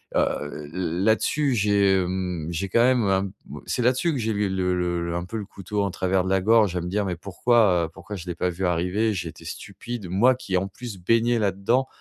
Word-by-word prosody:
heu, 75 +1 -1
l 90 0 -2
là-dessus, 125 +5 +2
j'ai, 100 -2 +3
hem, 90 -3 -3
j'ai 95 +3 -3
quand 115 +5 +4
même 125 -2 +3
un 95 0 +2 0.2
bah, - - -9
c'est - - -1
là-dessus 130 +8 +2
que 135 - -2
j'ai 110 0 -1
eu 105 0 0
le 90 -2 0
le 85 - -3
un 85 0 -3
peu 110 +5 -5
le 105 - -4
couteau 100 +1 -4
en 100 - 0
travers 95 0 0
de 95 - -3
la 95 - +3
gorge 105 -2 +4
à 90 - -1
me 90 - -5
dire: 105 +3 0
«Mais 90 - -2
pourquoi, 95 -1 +2
heu, - - -7
pourquoi 95 +4 -9
je 90 -2 -8
l'ai 85 - -3
pas 90 +2 0
vu 95 +2 -3
arriver?» 90 +6 +1
J'ai 90 -3 -3
été 80 - -13
stupide, 120 -6 -7
moi 120 +8 +4
qui 110 -7 -4
en 95 +2 -1
plus, 110 0 -8
baignais 115 +4 +2
là-dedans, 105 +6 +1
95 Hz, 235 wpm, -24 LUFS, 90-115 Hz, 0.2 s, quand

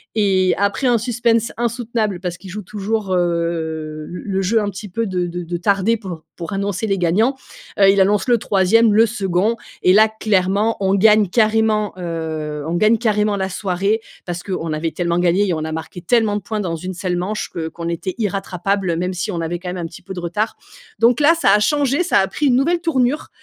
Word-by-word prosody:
et 190 -3 +3
après 200 +6 0
un 240 -1 +4
suspense 235 -1 +1
insoutenable, 230 -4 -1
parce 175 -2 -4
qu'il 190 - -12
joue 210 +2 -5
toujours, 205 +1 -3
heu, 170 -1 +1
le 155 -1 -5 0.2
le 195 -2 -1
jeu 220 +4 +2
un 205 - -1
petit 205 +1 -8
peu 230 +6 -2
de 180 -2 -1
de 175 +1 -5
de 175 +1 -4
tarder 200 +5 +2
pour 180 -6 -8
pour 170 -2 -6
annoncer 200 +2 -2
les 195 -1 0
gagnants, 215 +10 +2 0.4
heu, 195 -1 +7
il 195 0 +4
annonce 205 +4 +2
le 240 -1 +4
3e, 210 +3 +3
le 225 +2 +6
2d 205 -1 0 0.3
et 185 - +5
là 215 +2 +6
clairement 210 0 +1
on 190 0 +2
gagne 210 0 +5
carrément, 215 0 +2
heu 160 -3 -4
on 165 - -2
gagne 215 +5 +4
carrément 210 -3 +1
la 190 0 -1
soirée 195 +3 -1 0.2
parce 175 -1 -5
qu'on 165 -5 -3
avait 160 +1 -2
tellement 170 -1 -1
gagné 180 +3 +2
et - - +1
on 155 -1 -2
a 160 - -4
marqué 160 +2 -6
tellement 215 +3 +2
de 210 - -2
points 215 +2 -4
dans 175 -4 -2
une 185 +3 -5
seule 180 0 -2
manche 200 +4 -3
que 160 -1 -3
qu'on 170 0 -6
était 170 +2 -3
irrattrapables 195 -3 -1
même 180 +2 -2
si 185 +4 -3
on 175 - -3
avait, 165 +1 -2
quand 180 - -6
même, 180 - -4
un 170 - -4
petit 165 - -13
peu 190 - -7
de 185 - -5
retard, 175 +6 -2 0.4
donc 235 +1 +4
là, 315 +3 +6
ça 260 -12 +3
a 210 - +5
changé, 285 +6 +1
ça - - +3
a 195 - +2
pris 290 +9 -1
une 245 - +4
nouvelle 335 +6 +1
tournure, 290 -4 0
195 Hz, 220 wpm, -19 LUFS, 175-220 Hz, 0.4 s, heu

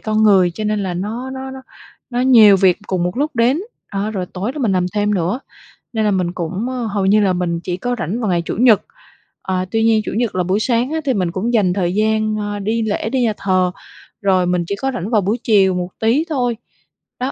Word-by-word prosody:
con 215 0 0
người, 195 -4 +5
cho 215 +5 -6
nên 210 -1 0
là 185 -2 -3
nó 225 +8 -4
nó 265 0 -6
nó 265 0 -9 0.5
nó 245 0 -1
nhiều 225 -6 +7
việc 185 0 +3
cùng 185 -2 -1
một 180 +4 -3
lúc 290 -1 -1
đến. 250 +7 +3 0.3
A, 200 +1 -2
rồi 190 -4 -3
tối 200 +9 -4
đó 300 - -7
mình 225 -7 +1
làm 180 -1 +1
thêm 210 0 +1
nữa, 185 +8 -1 0.5
nên 220 -1 0
là 210 - +2
mình 180 -2 0
cũng, 185 +7 -3
ơ 250 -2 -3
hầu 200 -3 -1
như 210 +2 +4
là 190 -2 +2
mình 175 -2 -1
chỉ 180 0 -3
có 245 +5 -2
rảnh 190 +9 -2
vào 215 - -1
ngày 175 -1 +1
Chủ - - -3
nhật, 230 -4 +5 0.6
ờ, 185 -1 -2
tuy 225 0 +1
nhiên 225 -1 +3
Chủ - - -3
nhật 235 -5 -1
là 180 - +1
buổi 190 +4 0
sáng 240 +3 0
á 320 - -1
thì 265 - +2
mình 180 -5 -1
cũng 220 +7 -2
dành 190 -5 +3
thời 180 -2 -1
gian, 215 0 +1
ơ, 205 -1 -3
đi 220 +3 -1
lễ, 220 0 -2
đi 260 0 0
nhà 225 -3 +2
thờ, 185 -2 +1 0.5
rồi 185 -2 +2
mình 180 -1 0
chỉ 200 - -2
có 270 - 0
rảnh 205 -2 -4
vào 215 -4 +3
buổi 205 +6 0
chiều 195 -4 +4
một 180 0 -3
tí 240 +8 +2
thôi. 245 -6 -1 0.6
Đó, 255 +2 -1
210 Hz, 250 wpm, -18 LUFS, 185-235 Hz, 0.6 s, nhiều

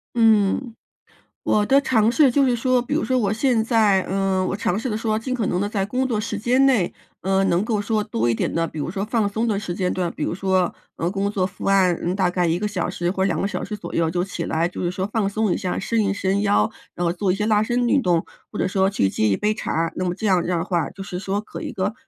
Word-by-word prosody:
嗯， 225 +1 +3 0.7
我 210 - +2
的 275 +1 +5
尝 230 -5 +2
试 275 -2 +4
就 280 +2 +3
是 245 - +2
说， 255 +1 +2
比 245 - -3
如 - - +1
说 255 +3 +1
我 205 -4 +1
现 230 0 +2
在， 220 -4 +3
嗯， 190 0 +1
我 195 - -1
尝 195 -2 -1
试 255 - -3
的 215 - -1
说 220 -1 -1
尽 255 +3 -3
可 230 -4 -1
能 180 0 0
的 205 - -1
在 200 -2 -1
工 255 +5 -1
作 230 -4 -1
时 215 0 -3
间 245 +6 +2
内， 235 -10 +3 0.3
呃， 195 +1 +1
能 180 0 +2
够 220 -2 -1
说 210 +1 0
多 115 - -1
一 120 - +2
点 - - -1
的， 165 0 0
比 155 - -8
如 145 - -3
说 195 +3 -3
放 220 -2 0
松 220 +3 -1
的 205 -3 0
时 180 -4 -5
间 180 -1 -1
段， 180 -2 -1
比 150 - -5
如 - - -1
说， 185 -1 +1 0.2
呃， 170 +2 -2
工 200 0 -1
作 195 -3 0
伏 185 +1 -7
案， 190 -3 +4
嗯， 175 +2 -1
大 185 -2 +1
概 180 -1 +1
1 165 +1 +1
个 210 +3 -1
小 200 -4 -2
时 175 +1 -2
或 190 -1 -1
2 190 -3 0
个 195 - 0
小 - - -4
时 210 - -5
左 - - -8
右 165 -1 +1
就 175 +2 -1
起 180 -3 -5
来， 165 +2 0
就 180 - -7
是 175 - 0
说 185 +1 -3
放 210 -3 +1
松 215 -2 0
一 - - -1
下， 185 -3 -2
伸 225 +2 0
一 195 - +1
伸 200 0 0
腰， 105 - +2 0.2
然 175 - -2
后 170 - +1
做 185 +1 0
一 - - 0
些 210 +1 -1
拉 215 -1 +3
伸 240 +2 0
运 275 - +3
动， 175 -7 +1 0.3
或 - - -6
者 - - +1
说 190 0 +2
去 100 - +1
接 110 +3 0
一 95 - +1
杯 210 +1 +1
茶， 165 -5 -2
那 185 - -2
么 180 -1 -1
这 220 - -5
样 185 -4 +3
的 170 -1 -1
话 170 -4 -1
就 195 - -9
是 180 -2 -5
说， 195 +1 -2
可 215 - -8
一 - - -5
个 195 +3 -2
195 Hz, 300 characters per minute, -22 LUFS, 180-220 Hz, 0.7 s, 的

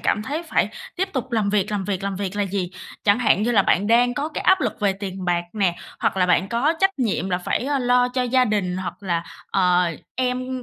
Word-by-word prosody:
cảm 210 - +1
thấy 290 +9 -3
phải 335 - +1 0.3
tiếp 380 +2 0
tục 260 -2 -4
làm 215 -3 +1
việc, 210 -1 +1
làm 205 -2 -2
việc, 195 -2 -2
làm 200 -1 -2
việc 200 0 -4
là 205 - +1
gì? 185 -2 -2 0.3
Chẳng 205 +2 +4
hạn 215 -4 +3
như 235 - +1
là 200 -4 +5
bạn 195 +2 +2
đang 245 +2 +4
có 290 +4 -2
cái - - -5
áp 375 0 +4
lực - - -2
về 200 -2 +2
tiền 190 -1 -6
bạc 175 -1 0
nè, 190 -5 +1 0.2
hoặc - - +1
là 180 -1 +3
bạn 180 +1 +2
có 240 +8 +2
trách 385 0 +5
nhiệm 200 - -1
là 180 - +1
phải, 180 - -2
ơ, 280 0 0
lo 245 0 +3
cho 255 0 -1
gia 255 +1 +3
đình, 200 -5 -1
hoặc 185 -2 -4
là, 170 -3 -1 0.3
ờ, 180 -2 +3 0.3
em 255 0 -2
210 Hz, 250 wpm, -22 LUFS, 190-250 Hz, 0.3 s, là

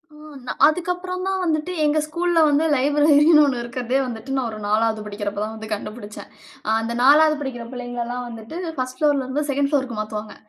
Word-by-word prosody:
ஓ! - - -15 0.3
நா - - -2 0.2
அதுக்கப்புறம் 360 +3 -2
தான் 385 -1 -1
வந்துட்டு 315 +1 -1
எங்க 300 +1 +2
ஸ்கூல்ல 340 +1 0
வந்து 295 +3 +2
லைப்ரரின்னு 295 +3 +5
ஒண்ணு 250 -4 -1
இருக்கறதே 245 +1 -2
வந்துட்டு 245 +2 -6
நான் 260 -3 0
ஒரு 215 - -8
4வது 220 +1 +1
படிக்கிறப்ப 205 -1 -4
தான் 220 +1 -4
வந்து 220 0 -9
கண்டுபிடிச்சேன். 210 0 -8 0.4
அ - - 0
அந்த 230 +1 -3
4வது 305 +3 +6
படிக்கிற 255 -4 -5
பிள்ளைங்களல்லாம் 245 0 -5
வந்துட்டு 225 +5 -9 0.2
1 255 0 -4
புளோர்லருந்து 290 -1 +1
2ன்ட் 280 +1 0
புளோர்க்கு 265 -5 -1
மாத்துவாங்க. 215 0 -5
260 Hz, 170 wpm, -22 LUFS, 225-300 Hz, 0.4 s, 4வது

